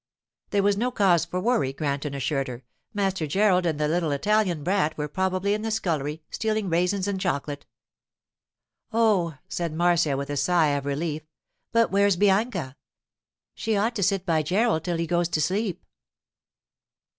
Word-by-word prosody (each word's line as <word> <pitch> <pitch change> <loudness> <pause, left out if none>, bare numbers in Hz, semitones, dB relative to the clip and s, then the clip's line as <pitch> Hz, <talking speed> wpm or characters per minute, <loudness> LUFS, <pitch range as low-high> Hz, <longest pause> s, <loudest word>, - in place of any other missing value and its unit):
There 200 -1 +1
was 200 0 +2
no 245 +4 +1
cause 185 -8 +3
for 180 +2 -3
worry, 215 - +1
Granton 140 0 -3
assured 135 0 -1
her. 125 0 -7 0.3
Master 190 -5 -1
Gerald 185 +1 +3
and 155 -3 -1
that 150 0 +1
little 165 -2 0
Italian 180 +1 +1
brat 180 -3 0
were 150 0 -2
probably 190 +4 0
in 210 - -2
the 225 - -2
scullery, 160 -8 -2
stealing 215 -3 -1
raisins 180 +3 +1
and 195 -2 -2
chocolate. 145 -5 -3 1.2
'Oh,' 210 -8 +2
said 170 -3 -3
Marcia, 170 -4 +2
with 140 +1 -4
a 145 - -2
sigh 170 -1 +3
of 140 -1 -1
relief; 150 +2 -2 0.5
'but 230 0 +3
where's 200 0 +3
Bianca? 195 - +1 0.8
She 220 -2 -1
ought 225 +4 0
to 205 - -2
sit 195 0 +1
by 160 -3 +2
Gerald 185 +2 +1
till 175 -2 -1
he 165 - -1
goes 175 +1 +1
to 160 - 0
sleep. 190 +4 -1
175 Hz, 165 wpm, -25 LUFS, 150-200 Hz, 1.2 s, cause